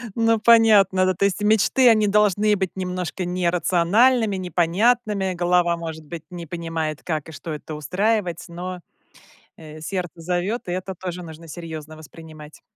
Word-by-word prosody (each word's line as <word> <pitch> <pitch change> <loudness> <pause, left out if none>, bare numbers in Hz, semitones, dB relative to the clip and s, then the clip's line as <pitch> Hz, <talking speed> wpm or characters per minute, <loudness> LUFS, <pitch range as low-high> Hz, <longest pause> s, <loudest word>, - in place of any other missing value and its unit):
Ну, 225 -1 +2
понятно, 210 -5 +5
да. 185 - +2
То 190 +3 0
есть 200 +1 -1
мечты, 220 +4 +4
они 215 -2 +4
должны 210 0 +3
быть 190 -2 -2
немножко 180 -1 -4
нерациональными, 185 +6 +2
непонятными. 190 +3 +1
Голова, 175 -1 +2
может 160 -2 -7
быть, 165 +1 -8
не 175 -2 -8
понимает, 165 -2 -4
как 155 -2 -3
и - - -9
что 160 +1 -8
это 150 +1 -7
устраивать, 180 - -1
но, 180 +1 -6 0.8
э, 155 -1 -11
сердце 175 -1 -5
зовёт, 180 +6 -2
и - - -3
это 185 +1 -4
тоже 180 0 -6
нужно 165 0 -11
серьёзно 155 -1 -8
воспринимать. 155 -1 -13
180 Hz, 150 wpm, -22 LUFS, 165-205 Hz, 0.8 s, понятно